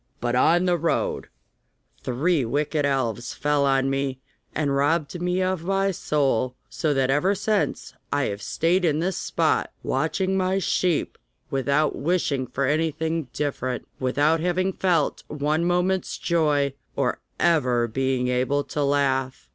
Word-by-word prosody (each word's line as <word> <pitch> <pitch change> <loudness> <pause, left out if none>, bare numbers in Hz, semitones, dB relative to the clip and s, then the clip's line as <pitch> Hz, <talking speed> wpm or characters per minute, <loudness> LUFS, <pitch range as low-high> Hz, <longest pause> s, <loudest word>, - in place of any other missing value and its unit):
But 120 0 -1
on 170 +7 +4
the 175 -2 +2
road 165 +2 -1 0.8
three 145 +5 +1
wicked 145 +4 0
elves 120 -3 -1
fell 145 -1 +1
on 135 0 +2
me, 135 -1 -1 0.4
and 145 -2 0
robbed 155 +4 0
me 180 +1 +1
of 185 -3 -1
my 195 +2 +1
soul, 135 -7 0 0.2
so 155 - 0
that 135 0 +2
ever 180 +8 +2
since 210 +1 -1 0.2
I 145 -1 +1
have 100 -3 -3
stayed 175 - +1
in 155 -4 +2
this 180 +3 -1
spot - - 0
watching 185 +7 0
my 190 0 +1
sheep 180 -3 0 0.3
without 140 +3 +1
wishing 140 -5 0
for 135 +3 -1
anything 160 +1 0
different, 130 -3 -3
without 145 +5 +2
having 180 +3 0
felt 175 -6 +1
one 150 +3 0
moment's 180 +2 0
joy, 150 -5 +1 0.2
or - - 0 0.2
ever 130 -8 +3
once 115 -2 -4
being 130 -1 0
able 130 +3 +1
to 150 - -4
laugh. 135 - 0
150 Hz, 145 wpm, -24 LUFS, 135-175 Hz, 0.8 s, on